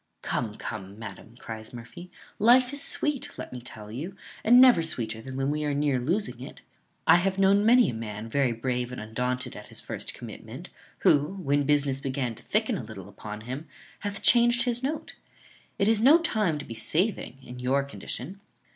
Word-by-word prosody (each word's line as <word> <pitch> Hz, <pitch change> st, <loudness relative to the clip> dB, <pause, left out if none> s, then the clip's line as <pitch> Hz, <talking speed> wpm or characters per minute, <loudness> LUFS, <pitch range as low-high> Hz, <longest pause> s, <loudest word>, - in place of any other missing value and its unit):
"Come, 110 Hz, -4 st, -2 dB
come, 100 Hz, -1 st, -6 dB
madam," 110 Hz, +1 st, -10 dB
cries 110 Hz, -1 st, -8 dB
Murphy, 120 Hz, +10 st, -10 dB, 0.3 s
"life 245 Hz, +4 st, +5 dB
is 285 Hz, -, -1 dB
sweet, 295 Hz, -3 st, -1 dB
let -, -, -7 dB
me 125 Hz, -, -6 dB
tell 110 Hz, -3 st, -7 dB
you, 160 Hz, -, -6 dB, 0.3 s
and 240 Hz, +3 st, +7 dB
never 255 Hz, -9 st, +8 dB
sweeter 115 Hz, -8 st, -2 dB
than 130 Hz, +2 st, -7 dB
when 135 Hz, +1 st, 0 dB
we 150 Hz, 0 st, -1 dB
are 145 Hz, -1 st, 0 dB
near 145 Hz, -3 st, +1 dB
losing 180 Hz, -, -2 dB
it. -, -, -10 dB, 0.4 s
I -, -, +7 dB
have 190 Hz, +2 st, 0 dB
known 195 Hz, +1 st, +4 dB
many 240 Hz, +2 st, +6 dB
a -, -, -8 dB
man 110 Hz, -1 st, -6 dB
very 130 Hz, +1 st, +1 dB
brave 125 Hz, +1 st, -2 dB
and 125 Hz, -, -6 dB
undaunted 125 Hz, +4 st, -2 dB
at -, -, -9 dB
his -, -, -5 dB
first -, -, -5 dB
commitment, -, -, -9 dB, 0.3 s
who, 145 Hz, +6 st, +3 dB
when 145 Hz, -6 st, 0 dB
business 140 Hz, -2 st, +2 dB
began 135 Hz, -3 st, -2 dB
to -, -, -12 dB
thicken -, -, +1 dB
a -, -, -6 dB
little -, -, -9 dB
upon 105 Hz, 0 st, -8 dB
him, 130 Hz, +7 st, -6 dB, 0.3 s
hath 205 Hz, -1 st, -4 dB
changed 240 Hz, 0 st, +6 dB
his 245 Hz, -1 st, 0 dB
note. 295 Hz, +3 st, -3 dB, 0.6 s
It 200 Hz, -, +2 dB
is 225 Hz, -1 st, +4 dB
no 275 Hz, +8 st, +7 dB
time 215 Hz, -, 0 dB
to 145 Hz, -, -7 dB
be 115 Hz, -, -7 dB
saving 155 Hz, -, -1 dB
in 125 Hz, 0 st, -9 dB
your 135 Hz, +2 st, +1 dB
condition." 140 Hz, +6 st, -7 dB
140 Hz, 190 wpm, -27 LUFS, 120-200 Hz, 0.6 s, never